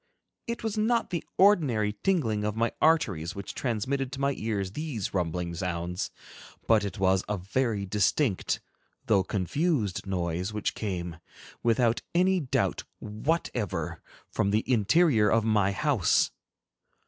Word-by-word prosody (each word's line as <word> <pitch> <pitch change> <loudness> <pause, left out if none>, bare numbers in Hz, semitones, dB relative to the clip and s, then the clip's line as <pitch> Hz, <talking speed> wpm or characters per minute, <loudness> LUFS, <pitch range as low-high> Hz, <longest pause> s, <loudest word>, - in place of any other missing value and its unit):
It 235 -1 -4
was 220 -1 -1
not 230 0 +1
the 170 -3 -2
ordinary 140 - +4
tingling 120 - +1
of 105 0 -1
my 115 +1 +1
arteries 100 - +2
which 100 0 -6
transmitted 130 +3 -2
to 135 - -5
my 140 0 +1
ears 100 -4 -2
these 130 -5 -4
rumbling 90 -1 -1
sounds, 85 0 -3 0.6
but 110 -2 +4
it 100 -4 -4
was 95 0 +2
a 105 - 0
very 105 +2 -1
distinct, 105 +3 +1 0.4
though 100 -3 +4
confused, 105 - -1
noise 90 +1 -2
which 105 - -1
came, 90 -5 -4 0.4
without 115 0 +2
any 185 +1 +4
doubt 140 -6 0
whatever, 110 - -2 0.3
from 100 - +1
the 105 +2 +2
interior 120 - +4
of 115 +2 +3
my 105 -3 +3
house. 120 - +2
110 Hz, 135 wpm, -28 LUFS, 95-140 Hz, 0.6 s, ordinary